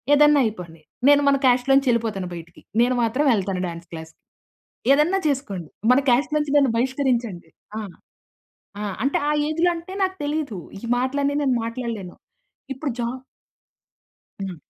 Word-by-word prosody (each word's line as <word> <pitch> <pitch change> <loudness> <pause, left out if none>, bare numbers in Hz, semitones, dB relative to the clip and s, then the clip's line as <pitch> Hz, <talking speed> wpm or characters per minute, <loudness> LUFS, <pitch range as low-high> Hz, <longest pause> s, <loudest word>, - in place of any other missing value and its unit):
ఏదైనా 295 0 +6
అయిపోండి. 175 -7 -6 0.3
నేను 290 0 +6
మన 275 - +4
కాస్ట్‌లోంచి 260 +2 +3
ఎళ్ళిపోతాను 215 -6 -2
బయటికి 170 0 -11 0.2
నేను 250 +1 +3
మాత్రం 255 +6 +1
ఎళ్తాను 195 -2 -2
డాన్స్ 170 0 -8
క్లాస్జకి. 160 0 -9 0.7
ఏదన్నా 315 +7 +3
చేసుకోండి. 205 - -3 0.2
మన 255 - +5
కాస్ట్‌లోంచి 295 +3 +1
నన్ను 275 -4 +4
బహిష్కరించండి." 240 - -1 0.3
ఆ! 220 - -3 1.2
అంటే 275 - +2
ఆ - - +2 0.2
ఏజ్‌లో 330 +3 +2
అంటే 340 +3 -8
నాకు 375 0 -1
తెలియదు. 290 -7 -2 0.2
ఈ - - -18
మాటలన్నీ 280 +3 0
నేను 260 -3 +2
మాట్లాడలేను. 230 -6 -5 0.6
ఇప్పుడు 275 +2 -4
జాబ్ 250 +2 -4 1.2
హ్మ్. 190 -3 -5
255 Hz, 130 wpm, -23 LUFS, 200-285 Hz, 1.2 s, ఏదైనా